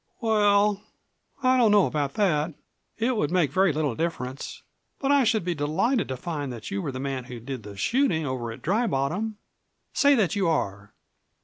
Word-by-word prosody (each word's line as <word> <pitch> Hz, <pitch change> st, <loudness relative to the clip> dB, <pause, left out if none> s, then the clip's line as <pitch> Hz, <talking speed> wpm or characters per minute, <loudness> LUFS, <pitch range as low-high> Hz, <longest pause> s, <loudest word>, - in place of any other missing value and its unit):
"Well, 205 Hz, -2 st, +3 dB, 0.6 s
I 255 Hz, 0 st, +4 dB
don't 235 Hz, -3 st, +5 dB
know 205 Hz, -2 st, +5 dB
about 145 Hz, -3 st, -2 dB
that. 165 Hz, -6 st, +1 dB, 0.4 s
It 240 Hz, +3 st, +1 dB
would 150 Hz, -9 st, 0 dB
make 170 Hz, -6 st, +2 dB
very 190 Hz, +3 st, +3 dB
little 150 Hz, -3 st, -1 dB
difference. 130 Hz, -3 st, -4 dB, 0.3 s
But 275 Hz, 0 st, 0 dB
I 285 Hz, -1 st, +5 dB
should 220 Hz, -5 st, +1 dB
be 180 Hz, -, 0 dB
delighted 180 Hz, -, 0 dB
to 130 Hz, -, -4 dB
find 145 Hz, -2 st, -4 dB
that 115 Hz, -3 st, -8 dB
you 100 Hz, -, -2 dB
were 140 Hz, -, -3 dB
the 130 Hz, -, -6 dB
man 135 Hz, -2 st, -3 dB
who 125 Hz, -1 st, -8 dB
did 130 Hz, +1 st, -6 dB
the 100 Hz, -1 st, -10 dB
shooting 180 Hz, -, +1 dB
over 125 Hz, -4 st, -3 dB
at 115 Hz, -, -11 dB
Dry 220 Hz, +8 st, +1 dB
Bottom. 190 Hz, +8 st, -1 dB, 0.6 s
Say 285 Hz, 0 st, +5 dB
that 210 Hz, -7 st, +1 dB
you 195 Hz, -3 st, +1 dB
are!" 100 Hz, -10 st, -2 dB
165 Hz, 190 wpm, -26 LUFS, 135-210 Hz, 0.6 s, don't